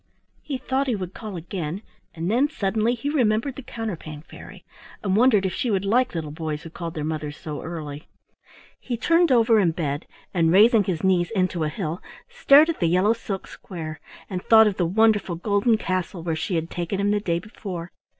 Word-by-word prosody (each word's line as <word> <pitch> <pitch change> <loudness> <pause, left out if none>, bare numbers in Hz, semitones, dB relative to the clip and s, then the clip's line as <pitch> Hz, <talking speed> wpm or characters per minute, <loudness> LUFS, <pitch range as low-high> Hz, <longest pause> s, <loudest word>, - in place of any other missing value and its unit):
He 280 -3 -4
thought 265 +2 -1
he 245 - +1
would 185 -2 -5
call 215 -4 -7
again, 175 +2 -5 0.3
and 170 +4 -2
then 265 +6 +3
suddenly 220 -1 0
he 240 +4 -5
remembered 250 -2 +1
the - - -7
Counterpane 185 - -6
Fairy, - - -13 0.4
and 195 -2 +1
wondered 220 -3 +4
if 185 - -1
she 250 - -1
would 200 -2 0
like 245 +2 +2
little 155 -3 -3
boys 155 -1 -4
who 165 - -9
called 170 -1 -6
their 155 - -3
mothers 150 -1 -4
so 150 -2 -6
early. 150 -3 -7 0.7
He 245 -2 -4
turned 335 +4 +3
over 230 -2 +5
in 175 -5 +2
bed, 150 -3 -3 0.3
and 165 -3 +3
raising 215 +3 +6
his 180 -3 -2
knees 180 -2 +2
into 185 -3 0
a - - -1
hill 155 +3 -4 0.3
stared 315 -12 +5
at 335 - -2
the 170 - +2
yellow 185 +6 +3
silk 200 -4 -5
square 160 -4 -8 0.3
and 185 -2 -4
thought 220 -1 +7
of 205 -3 0
the 175 - +1
wonderful 205 -1 +2
golden 205 +5 +2
castle 185 -3 -3
where 165 -2 -1
she 175 +3 -2
had 165 0 -2
taken 175 +2 -3
him 200 +1 +2
the 210 - +2
day 170 -5 -1
before. 180 -3 -7
190 Hz, 200 wpm, -24 LUFS, 165-225 Hz, 0.7 s, thought